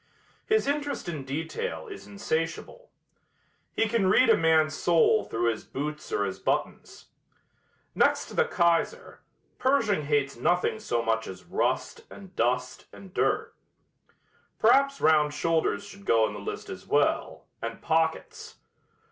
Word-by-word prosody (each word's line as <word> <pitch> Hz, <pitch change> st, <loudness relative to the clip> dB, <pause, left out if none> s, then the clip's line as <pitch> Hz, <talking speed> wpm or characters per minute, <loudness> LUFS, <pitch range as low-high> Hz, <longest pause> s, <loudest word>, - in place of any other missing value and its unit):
His 435 Hz, 0 st, +2 dB
interest 285 Hz, -4 st, -2 dB
in 155 Hz, -6 st, -5 dB
detail 160 Hz, -, -4 dB
is 405 Hz, -, -10 dB
insatiable. 200 Hz, -, -4 dB, 0.9 s
He 225 Hz, -, +2 dB
can 220 Hz, -3 st, +1 dB
read 250 Hz, +7 st, +5 dB
a -, -, +7 dB
man's 160 Hz, -1 st, +3 dB
soul 175 Hz, +7 st, +3 dB
through 115 Hz, +1 st, 0 dB
his 110 Hz, -, -7 dB
boots 150 Hz, +2 st, -6 dB
or 100 Hz, -, 0 dB
his 95 Hz, -1 st, -5 dB
buttons. -, -, -3 dB, 0.8 s
Next -, -, +2 dB
to -, -, -12 dB
the -, -, +3 dB
Kaiser, 175 Hz, -, 0 dB, 0.4 s
Pershing 225 Hz, -, +2 dB
hates 145 Hz, -1 st, 0 dB
nothing 175 Hz, -, +1 dB
so 120 Hz, -, -1 dB
much 110 Hz, 0 st, 0 dB
as 95 Hz, -, -9 dB
rust -, -, -1 dB
and 190 Hz, -2 st, -13 dB
dust 125 Hz, +2 st, -1 dB
and 190 Hz, -2 st, -13 dB
dirt. -, -, 0 dB, 1.0 s
Perhaps 275 Hz, 0 st, +3 dB
round 150 Hz, -2 st, +3 dB
shoulders 165 Hz, +5 st, 0 dB
should 200 Hz, -1 st, -13 dB
go 115 Hz, -7 st, +4 dB
in -, -, -7 dB
the 105 Hz, -, -7 dB
list 100 Hz, -, -6 dB
as -, -, -9 dB
well, -, -, 0 dB, 0.2 s
and 115 Hz, 0 st, -5 dB
pockets. 160 Hz, 0 st, -1 dB
160 Hz, 140 wpm, -27 LUFS, 135-215 Hz, 1.0 s, a